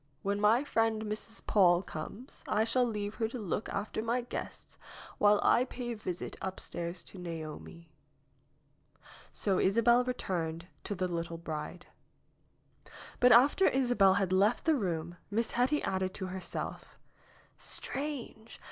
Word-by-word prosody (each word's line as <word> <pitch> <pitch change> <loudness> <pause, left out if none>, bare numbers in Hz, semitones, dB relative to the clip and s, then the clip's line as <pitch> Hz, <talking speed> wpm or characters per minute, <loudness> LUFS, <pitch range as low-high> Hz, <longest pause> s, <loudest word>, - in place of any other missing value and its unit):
When 200 +1 -1
my 225 +5 +4
friend, 225 -5 +1
Mrs. 215 +1 -5
Paule, 180 -3 +4
comes, 210 - -8
I 215 - +2
shall 245 +3 +3
leave 210 -3 -3
her 225 - +3
to 240 - -6
look 205 -1 -3
after 205 +2 -3
my 235 +3 0
guests 245 - -7 0.4
while 205 0 +5
I 245 - +5
pay 245 -1 -5
a - - -3
visit 185 -4 -5
upstairs 175 -2 -5
to 190 - -9
Naomi." 165 -1 -7 1.4
So 195 -3 0
Isabel 230 +5 +4
returned 170 -9 -3 0.2
to 205 - -2
the 185 0 -1
little 170 -1 -3
bride. 160 +1 -6 1.3
But 250 0 +6
after 275 +11 +6
Isabel 245 -8 +4
had 195 -2 +1
left 205 +5 +3
the 320 - +4
room 175 - -2
Miss 220 +2 0
Hetty 260 +5 +1
added 190 -1 -1
to 190 - -3
herself: 185 0 -6 0.6
"Strange! 265 -6 -3
205 Hz, 140 wpm, -31 LUFS, 180-235 Hz, 1.4 s, But